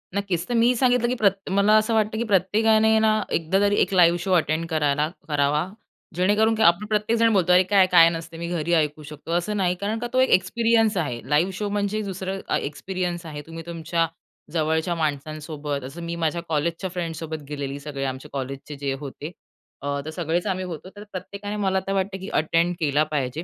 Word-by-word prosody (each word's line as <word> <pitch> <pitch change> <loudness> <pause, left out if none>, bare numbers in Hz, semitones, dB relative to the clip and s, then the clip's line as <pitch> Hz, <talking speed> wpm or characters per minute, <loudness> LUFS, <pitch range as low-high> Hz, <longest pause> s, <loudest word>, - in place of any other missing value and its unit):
नक्कीच. 190 -4 -1
तर 245 - -2
मी 235 +1 +4
सांगितलं 245 -1 +3
की 250 - 0
प्रत 200 -5 +1
मला 200 +2 +3
असं 215 +2 +1
वाटतं, 220 0 +1
की 235 - 0
प्रत्येकाने 220 +3 +3
ना, 215 0 +3
एकदा 165 +4 +1
तरी 205 0 +3
एक - - +1
लाईव्ह 175 -2 +5
शो 185 +2 -3
अटेंड 160 -1 +1
कराला 150 -1 +1 0.2
करावा, 150 +2 +1 0.5
जेणेकरून 210 +5 +3
काय 220 - +2
आपण 175 +5 +3
प्रत्येकजण 225 +2 +2
बोलतो, 180 -3 +3
"अरे, 180 +1 +6
काय? 190 0 +4
काय 165 -2 +8
नसतं, 165 0 -8
मी 170 0 -4
घरी 170 -1 -1
ऐकू 150 0 -2
शकतो," 150 +2 -9
असं 175 +5 0
नाही. 180 -2 +1
कारण 215 +3 -1
का, 240 - -3
तो 255 - +3
एक 260 - +3
एक्सपिरियन्स 225 +1 +3
आहे. 135 -8 -2
लाईव्ह 155 +6 +2
शो 210 - -2
म्हणजे 205 +1 -1
दुसरं 190 +1 -4
अ, - - +1
एक्सपिरियन्स 175 +3 -4
आहे. 150 -2 -6
तुम्ही 165 0 -8
तुमच्या 165 0 -1 0.5
जवळच्या 160 +1 0
माणसांसोबत 150 -2 -3
असं 135 +7 -8
मी 170 0 -4
माझ्या 170 +2 -1
कॉलेजच्या 165 +4 -1
फ्रेंडसोबत 165 -3 -5
गेलेली, 140 -1 -4
सगळे 140 -1 -5
आमच्या 130 0 -5
कॉलेजचे 135 +2 -5
जे 140 -1 -2
होते. 145 +2 -7 0.5
अ, 140 0 -2
तर 155 - -4
सगळेच 170 +1 -2
आम्ही 185 -1 -1
होतो. 180 +1 -7
तर 205 - -9
प्रत्येकाने, 200 +3 -6
मला 190 -2 +1
तर 195 - 0
वाटतं, 190 0 -1
की 190 - -7
अटेंड 165 +3 +1
केला 150 -1 +2
पाहिजे. 140 +2 -2
175 Hz, 195 wpm, -24 LUFS, 155-205 Hz, 0.5 s, काय